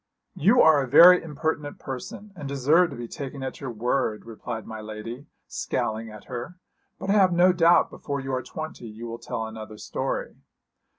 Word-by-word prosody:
'You 220 - +4
are 155 -3 +6
a 135 - -3
very 175 +7 +8
impertinent 150 -1 -3
person, 145 +10 -8
and 140 - -7
deserve 145 +6 +3
to - - -8
be 120 -1 -6
taken 135 +2 -7
at 130 - -6
your 135 - -4
word,' 120 -1 -1
replied 115 0 -6
my 110 -1 -7
lady, 110 +5 -8 0.2
scowling 110 +1 -3
at 105 -1 -11
her; 125 +8 -7 0.4
'but 195 - -2
I - - +4
have 195 -3 +5
no 180 +1 +5
doubt 170 0 +4
before 140 -1 -4
you 135 0 -4
are 130 - 0
twenty 155 -4 -7
you 110 +2 -9
will 115 0 -6
tell 110 - -4
another 110 -1 -8
story.' - - -4
135 Hz, 185 wpm, -25 LUFS, 115-160 Hz, 0.4 s, very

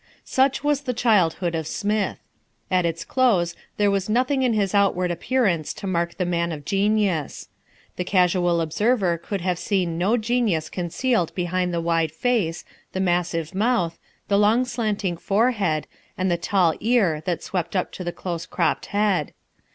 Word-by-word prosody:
Such 265 +1 +1
was 290 -1 +1
the 250 -3 -3
childhood 185 -7 +2
of 160 -2 -2
Smith. 210 +3 -1 0.5
At 180 -2 +3
its 165 0 -4
close 200 -10 +2 0.2
there 205 -1 +3
was 195 0 -1
nothing 255 +4 +2
in 250 -3 +2
his 200 -3 0
outward 190 -3 +2
appearance 175 - 0
to - - -8
mark 170 -2 -1
the 180 - 0
man 170 -1 0
of 145 -3 -7
genius. 200 -4 0 0.5
The 180 - -1
casual 180 -2 +2
observer 185 +1 +1
could 195 +3 -4
have 180 -1 -1
seen 180 -5 -1
no 205 +7 +2
genius 220 -8 0
concealed 180 +2 -1
behind 180 0 -1
the 170 - -1
wide 165 -2 +1
face, 180 -3 -1 0.3
the 190 - -2
massive 175 -2 0
mouth, 190 -5 0 0.3
the 200 -1 +3
long 220 +5 +4
slanting 210 -7 -2
forehead, 200 -6 +1 0.3
and 185 0 0
the - - +3
tall 170 -1 +2
ear 210 -10 +2
that 175 -2 -1
swept 175 -1 -3
up 185 - 0
to 185 - -7
the 175 - -3
close 170 -1 -5
cropped - - 0
head. 200 -7 0
185 Hz, 165 wpm, -23 LUFS, 170-215 Hz, 0.5 s, long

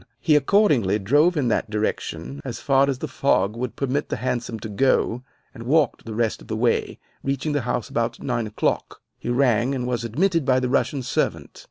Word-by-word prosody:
He 155 -2 +3
accordingly 145 - +3
drove 145 - +3
in 135 -4 +1
that 110 0 0
direction, 90 - -3
as - - -5
far 135 0 +3
as 135 - -1
the 155 - -4
fog 110 -7 +1
would 125 +1 -4
permit 140 +2 -1
the - - -1
hansom 120 -3 -3
to - - -5
go, 120 +2 +1 0.3
and 115 - -10
walked 145 +7 +1
the 110 -2 -6
rest 115 -1 0
of - - -14
the 110 - -3
way, 120 +1 0 0.3
reaching 135 +3 -1
the 145 -1 0
house 120 - -1
about 115 0 -2
nine 115 -2 -2
o'clock. 105 - -2 0.2
He - - -5
rang, 125 0 +2
and 125 -2 -2
was 120 -2 -2
admitted 165 - +1
by 130 0 +3
the 125 -1 -1
Russian 135 0 0
servant. - - -2
125 Hz, 200 wpm, -23 LUFS, 115-140 Hz, 0.3 s, He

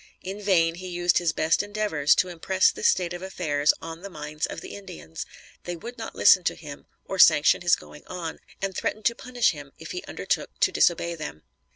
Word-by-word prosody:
In 195 +3 -6
vain 170 -5 +3
he 185 +2 -8
used 175 -1 +2
his 175 -2 +1
best 160 +1 +2
endeavors 205 -8 +1
to 185 - +1
impress 185 +2 +2
this - - 0
state 175 -2 +1
of 175 - -6
affairs 155 -6 +1
on 165 0 -7
the 200 - -7
minds 150 -2 -4
of - - -6
the - - -9
Indians. 180 - -8 0.4
They 175 - -3
would 235 +8 -8
not 225 - -6
listen 185 - +6
to - - +1
him 145 -3 -10 0.2
or 190 - -5
sanction 155 -3 +6
his 175 -1 +4
going 150 - -14
on, 170 -3 -5 0.2
and 195 -1 -2
threatened 215 - -3
to 235 - +4
punish 245 0 +1
him 150 -3 -10
if - - -9
he 365 0 -5
undertook - - -3
to - - +4
disobey 170 0 +2
them. 155 - -7
175 Hz, 210 wpm, -26 LUFS, 155-190 Hz, 0.4 s, listen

